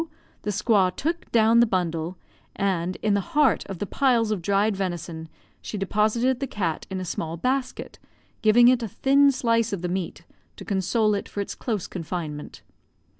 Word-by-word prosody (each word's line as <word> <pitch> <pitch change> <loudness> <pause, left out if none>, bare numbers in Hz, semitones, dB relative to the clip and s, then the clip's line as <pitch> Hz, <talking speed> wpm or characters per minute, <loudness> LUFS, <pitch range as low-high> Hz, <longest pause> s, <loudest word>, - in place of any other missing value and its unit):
the - - -4
squaw 205 -2 +3
took 330 - -3
down 225 0 +5
the 235 - +5
bundle, 175 -3 -2 0.4
and, 185 -2 -1
in 210 -1 +2
the 200 +5 -2
heart 290 -6 +4
of 195 - -6
the 205 - -3
piles 235 -1 +2
of 205 -4 -1
dried 200 +4 +1
venison, 170 -4 -4 0.3
she 215 - -5
deposited 215 +6 +1
the 275 - -2
cat 180 -9 -3
in 190 -1 -3
a 185 - -4
small 165 -1 -4
basket, 255 +7 -2 0.4
giving 240 +2 +6
it 250 -1 +4
a 230 - -2
thin 275 +7 +4
slice 230 -3 +1
of 190 -3 -4
the - - 0
meat 175 -2 -4 0.3
to - - -10
console 210 +2 +1
it 200 - -3
for - - -6
its 200 - -3
close 215 -7 -3
confinement. 160 -4 -6
205 Hz, 175 wpm, -25 LUFS, 180-235 Hz, 0.4 s, giving